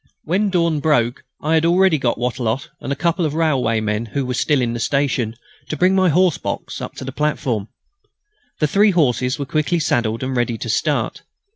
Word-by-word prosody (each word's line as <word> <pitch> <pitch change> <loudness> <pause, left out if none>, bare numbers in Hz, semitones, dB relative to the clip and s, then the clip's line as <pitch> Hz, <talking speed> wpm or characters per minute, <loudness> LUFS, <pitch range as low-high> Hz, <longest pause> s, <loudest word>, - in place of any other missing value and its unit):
When 195 +6 +1
dawn 170 -4 +1
broke 130 -5 +1 0.2
I 155 +2 +1
had 160 0 +3
already 175 -1 +4
got 120 -3 0
Wattrelot 125 0 -2
and - - -5
a - - 0
couple 170 +4 0
of 150 -2 -1
railwaymen 115 -8 0
who 140 -2 -1
were 125 - -2
still 140 +3 +1
in 120 -2 0
the 120 - -4
station 130 -4 0 0.3
to 155 - -3
bring 185 +5 +3
my 190 -1 +3
horse 180 +1 +3
box - - -5
up - - -6
to - - -7
the 135 - -4
platform. 130 -7 -1 0.9
The 155 - +1
three 205 +7 +4
horses 130 - +1
were 140 - -3
quickly 155 +4 0
saddled 115 -5 0
and 130 0 -2
ready 120 -1 0
to 115 - -5
start. 110 - 0
140 Hz, 195 wpm, -20 LUFS, 120-165 Hz, 0.9 s, already